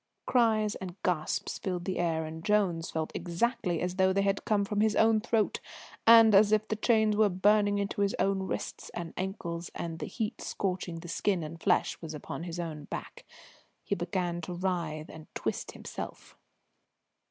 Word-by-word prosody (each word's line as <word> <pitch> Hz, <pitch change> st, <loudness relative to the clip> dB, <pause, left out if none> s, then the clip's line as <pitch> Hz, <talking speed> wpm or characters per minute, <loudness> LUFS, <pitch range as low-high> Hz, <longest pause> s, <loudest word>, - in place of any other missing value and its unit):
Cries 220 Hz, -4 st, +3 dB
and 185 Hz, -2 st, -7 dB
gasps 165 Hz, -4 st, -1 dB
filled 180 Hz, -2 st, -3 dB
the 190 Hz, -, -2 dB
air, 165 Hz, -2 st, 0 dB
and 160 Hz, +1 st, -7 dB
Jones 185 Hz, -6 st, +1 dB
felt 160 Hz, -1 st, -3 dB
exactly 180 Hz, +1 st, -1 dB
as 180 Hz, +1 st, -2 dB
though 190 Hz, 0 st, +4 dB
they 195 Hz, +1 st, +1 dB, 0.2 s
came 205 Hz, -2 st, +2 dB
from 205 Hz, +1 st, 0 dB
his 215 Hz, -1 st, +3 dB
own 220 Hz, 0 st, +5 dB
throat, 225 Hz, -2 st, +1 dB, 0.5 s
and 225 Hz, -1 st, +9 dB
as 205 Hz, +1 st, +6 dB
if 215 Hz, 0 st, +3 dB
the 220 Hz, -, -1 dB
chains 220 Hz, -1 st, +3 dB
were 210 Hz, 0 st, +4 dB
burning 205 Hz, +2 st, +3 dB
into 200 Hz, 0 st, -2 dB
his 200 Hz, 0 st, +1 dB
own 190 Hz, 0 st, +1 dB
wrists -, -, -4 dB
and 170 Hz, -2 st, -5 dB
ankles, 175 Hz, -3 st, -4 dB
and 165 Hz, -1 st, -4 dB
the -, -, -4 dB
heat 220 Hz, -3 st, -4 dB
scorching 180 Hz, -3 st, -3 dB
the 175 Hz, -, -9 dB
skin 180 Hz, +1 st, 0 dB
and 160 Hz, +2 st, -8 dB
flesh 185 Hz, -, +2 dB, 0.2 s
upon 160 Hz, +2 st, -6 dB
his 175 Hz, 0 st, -5 dB
own 155 Hz, -4 st, -5 dB
back. -, -, -7 dB, 0.6 s
He -, -, -1 dB
began 175 Hz, -1 st, -2 dB
to 175 Hz, +2 st, -5 dB
writhe 170 Hz, -4 st, -2 dB
and 160 Hz, -1 st, -11 dB
twist -, -, -3 dB
himself. -, -, -8 dB
190 Hz, 175 wpm, -30 LUFS, 170-210 Hz, 0.6 s, and